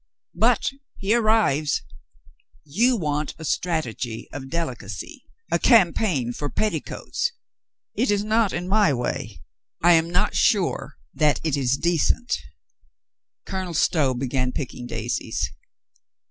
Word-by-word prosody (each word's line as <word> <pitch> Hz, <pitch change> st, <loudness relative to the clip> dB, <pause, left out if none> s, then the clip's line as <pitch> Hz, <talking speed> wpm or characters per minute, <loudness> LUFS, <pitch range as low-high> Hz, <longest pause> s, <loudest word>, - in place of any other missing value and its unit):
"But -, -, +2 dB, 0.3 s
he 200 Hz, +2 st, +1 dB
arrives. 215 Hz, -, +2 dB, 0.8 s
You 230 Hz, -, +2 dB
want 150 Hz, -4 st, -2 dB
a 160 Hz, -, -8 dB
strategy 130 Hz, -10 st, -2 dB
of 135 Hz, -1 st, -7 dB
delicacy, 170 Hz, +1 st, -5 dB, 0.3 s
a -, -, +2 dB
cam 210 Hz, -9 st, +5 dB
paign 135 Hz, -, -1 dB
for 145 Hz, -, -3 dB
petticoats. 215 Hz, -, -2 dB, 0.6 s
It 250 Hz, +4 st, 0 dB
is 205 Hz, 0 st, +2 dB
not 215 Hz, -1 st, +2 dB
in 175 Hz, +1 st, -3 dB
my 200 Hz, -7 st, +3 dB
way. 120 Hz, -2 st, -4 dB, 0.4 s
I 175 Hz, -, +7 dB
am 165 Hz, 0 st, +4 dB
not 180 Hz, +1 st, +1 dB
sure -, -, +1 dB, 0.2 s
that 150 Hz, -1 st, +2 dB
it 155 Hz, -3 st, +1 dB
is 135 Hz, -1 st, +1 dB
decent." 175 Hz, -, +1 dB, 1.1 s
Colonel 185 Hz, -3 st, -4 dB
Stow 145 Hz, -4 st, +2 dB
began 130 Hz, 0 st, -1 dB
picking 125 Hz, -2 st, -5 dB
daisies. 115 Hz, 0 st, -2 dB
160 Hz, 120 wpm, -24 LUFS, 135-200 Hz, 1.1 s, I